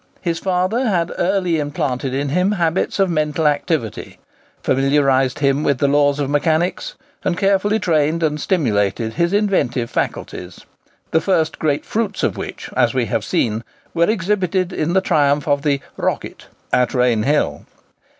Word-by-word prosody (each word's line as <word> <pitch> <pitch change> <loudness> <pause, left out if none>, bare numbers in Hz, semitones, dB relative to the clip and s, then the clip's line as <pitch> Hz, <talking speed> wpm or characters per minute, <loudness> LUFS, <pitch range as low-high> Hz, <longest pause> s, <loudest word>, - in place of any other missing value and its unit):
His 170 -2 -2
father 190 +7 0
had 175 -5 0
early 180 -3 +1
implanted 140 -3 -2
in 140 +2 -1
him 180 +7 +1
habits 170 -2 0
of 195 -1 +3
mental 155 0 0
activity, 145 - -1 0.5
familiarized 135 -1 +2
him 140 0 +1
with 140 -3 +1
the 140 - +2
laws 145 0 +3
of 140 - 0
mechanics, 160 - 0 0.3
and 175 - 0
carefully 200 +2 +2
trained 165 -4 +1
and 150 -1 0
stimulated 110 - 0
his 170 +8 +1
inventive 190 - 0
faculties, 90 0 -4 0.5
the 160 - +3
first 160 -5 0
great 145 -2 0
fruits 215 -3 -2
of - - +1
which, - - -6
as - - +2
we - - +1
have - - -1
seen, 110 0 -1 0.3
were 170 +2 +2
exhibited 185 -3 0
in 155 +2 -1
the 190 - +3
triumph 145 -2 +2
of 145 -1 +2
the 140 -2 +1 0.2
"Rocket" - - -3 0.3
at 125 +1 +2
Rainhill. 125 - +1
155 Hz, 150 wpm, -19 LUFS, 140-185 Hz, 0.5 s, of